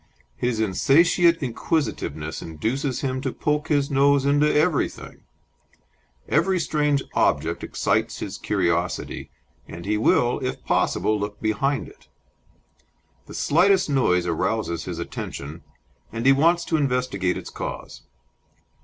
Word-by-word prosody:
His 120 - -1
insatiate 165 - +3
inquisitiveness 80 - -2
induces 120 - -3
him 130 -1 -2
to - - -2
poke 150 +1 -1
his 145 -3 +1
nose 140 0 +3
into 145 +2 +3
everything; 155 0 -1 1.0
every 180 +5 +2
strange 150 -4 +1
object - - +1
excites - - -1
his - - -6
curiosity, 85 +1 -1 0.4
and 85 +1 -9
he 105 +1 0
will, 120 +2 +2
if 130 - -4
possible, 110 0 +1
look 105 0 -5
behind 125 +6 0
it; - - -18 1.2
the - - -10
slightest 180 +1 +3
noise 90 -10 +2
arouses 85 +1 -1
his - - -5
attention, 75 +4 -6 0.5
and 115 +2 -4
he 135 - +7
wants 165 +5 +3
to 160 - 0
investigate 125 -10 0
its - - -8
cause. - - -7
135 Hz, 120 wpm, -23 LUFS, 105-150 Hz, 1.2 s, he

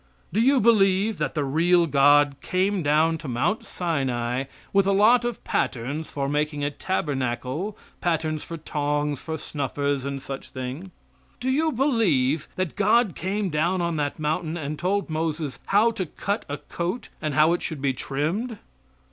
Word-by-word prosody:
Do 215 - +3
you 270 +3 +5
believe 205 -2 +3
that 150 -1 -2
the 150 - +1
real 170 +5 +3
God 145 -1 +4
came 190 +1 0
down 160 +2 +2
to 150 - -8
Mount 130 - 0
Sinai 130 -7 -1 0.3
with 195 -1 +4
a - - +4
lot 220 +5 +5
of 240 -2 -3
patterns 140 +6 -2
for 140 -1 -2
making 150 0 -1
a 145 - 0
tabernacle 140 - -2 0.2
patterns 155 -3 0
for 165 - -6
tongs, 145 -2 -1
for 160 -1 -4
snuffers, 140 -1 -2
and 140 0 -3
such 135 0 -7
things? 130 +8 -6 0.5
Do 260 +1 0
you 315 +4 +2
believe 170 - +2
that 185 -4 -2
God 215 0 +3
came 195 +1 -2
down 170 +5 +1
on 170 -2 -1
that 145 -1 -1
mountain 155 +2 -1
and 150 -1 -4
told 195 +4 0
Moses 155 -2 -2
how 215 +4 +4
to 185 -5 -3
cut 200 +7 -3
a 145 - -3
coat, 175 - -4
and 155 -3 -2
how 155 +2 +5
it 175 - -1
should 160 -4 -4
be 135 -1 +1
trimmed? 170 - -2
160 Hz, 165 wpm, -25 LUFS, 145-195 Hz, 0.5 s, you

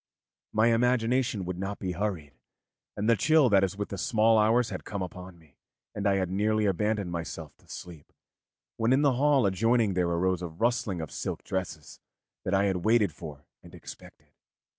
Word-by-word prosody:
My 110 +2 +3
imagination 120 -3 +1
would 90 0 -5
not 95 +1 -4
be 95 - -4
hurried, 90 -6 -3 0.6
and 105 +1 -1
the 115 - +5
chill 150 +2 +4
that 100 -2 +4
is 95 +1 -1
with 105 - -4
the 100 - -5
small 110 0 +3
hours 115 +2 +2
had - - -5
come 100 -3 -4
upon 90 0 -9
me, 80 -4 -24 0.4
and 100 0 -2
I 100 - +3
had 95 -2 -1
nearly 105 +2 +1
abandoned 100 -1 0
myself 80 -3 -6
to - - -27
sleep, 85 -5 -10 0.7
when 115 +3 +2
in 140 +3 +3
the 140 -2 +4
hall 140 -1 +3
adjoining 110 +2 +2
there 90 -1 +1
arose 90 +1 0
the 90 - -4
rustling 105 0 -1
of 80 - -7
silk - - -5
dresses 90 -5 -5 0.5
that 95 - +1
I 95 - +3
had 95 -2 +1
waited 105 -1 +2
for 75 -2 -10 0.2
and - - -14
expected. - - -13
100 Hz, 185 wpm, -28 LUFS, 90-115 Hz, 0.7 s, the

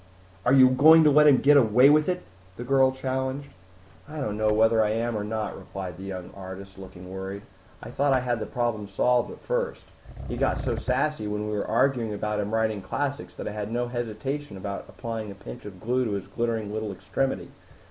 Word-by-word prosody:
"Are 125 - +4
you 130 -1 +8
going 155 +5 +7
to 150 - +5
let 150 +1 +6
him 140 -3 +7
get 145 +2 +5
away 125 +1 +6
with 155 +3 +3
it?" 180 0 -2 0.3
the 120 - -6
girl 130 +1 +4
challenged. 130 +1 -3 0.6
"I 155 0 -6
don't 105 -7 -2
know 110 0 +1
whether 110 +1 +4
I 105 - +1
am 115 +1 -1
or 105 - -2
not," 110 0 -3
replied 95 -3 -7
the 95 - -9
young 95 -2 -6
artist, 95 0 -9
looking 95 -1 -11
worried. 95 +1 -6 0.4
"I - - -8
thought 140 0 +1
I 130 -1 +3
had 120 -2 -1
the 110 - -4
problem 120 -4 -2
solved 120 +5 +1
at - - -11
first. - - -2 0.4
He - - -4
got - - +1
so - - -1
sassy 150 -8 -1
when 105 0 -3
we - - -2
were 100 - -2
arguing 115 -2 +1
about 105 0 -2
him 105 0 -2
writing 110 -2 0
classics 140 +8 -4
that - - -6
I - - -3
had 105 0 -5
no 120 +1 -1
hesitation 120 +2 -4
about 100 +1 -6
applying 115 -2 -5
a 100 - -8
pinch - - -10
of 95 -3 -9
glue 125 +4 0
to 110 - -2
his 100 -2 -3
glittering 115 -3 -2
little 110 -1 -3
extremity. 100 +8 -3
110 Hz, 215 wpm, -26 LUFS, 105-130 Hz, 0.6 s, you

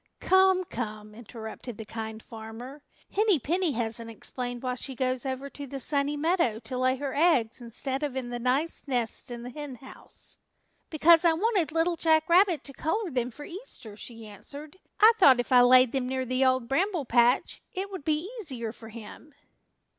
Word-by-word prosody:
"Come, 375 0 +4
come," 215 -6 -6
interrupted 225 0 -9
the 220 - -7
Kind 220 0 -6
Farmer. 230 +5 -9 0.3
"Henny 420 -3 +3
Penny 330 +4 0
hasn't 230 -1 -3
explained 245 +2 -5
why 255 -1 -1
she 260 +1 -5
goes 255 +1 -1
over 265 +1 -3
to 285 -1 -8
the 275 +1 -6
Sunny 285 +2 -1
Meadow 315 - +1
to 255 - -5
lay 255 0 +2
her 275 0 -4
eggs 265 -8 +2
instead 260 +4 -3
of 290 -3 -2
in 250 -2 -4
the 240 - -3
nice 270 +7 -1
nests 245 -4 -2
in 240 -1 -6
the 245 - -7
Henhouse." 265 -2 -8 0.5
"Because 330 +2 +6
I 335 -2 +5
wanted 380 -2 +1
Little 330 +2 +1
Jack 315 -1 +3
Rabbit 355 -2 +4
to 275 - -7
color 355 - -2
them 250 -2 -1
for 290 +4 -10
Easter," 345 - -8
she 225 +1 -8
answered. 280 - -9 0.2
"I 435 +2 +8
thought 270 -9 +7
if 245 - -2
I 250 -1 +8
laid 255 0 +6
them 260 -2 -1
near 260 0 -1
the 255 +2 +1
Old 260 -2 +2
Bramble 340 - 0
Patch 240 +1 +2
it 390 +1 -4
would 375 -6 -6
be 310 +3 0
easier 255 - -4
for 225 -1 -12
him." 230 +6 -11
265 Hz, 185 wpm, -28 LUFS, 240-320 Hz, 0.5 s, I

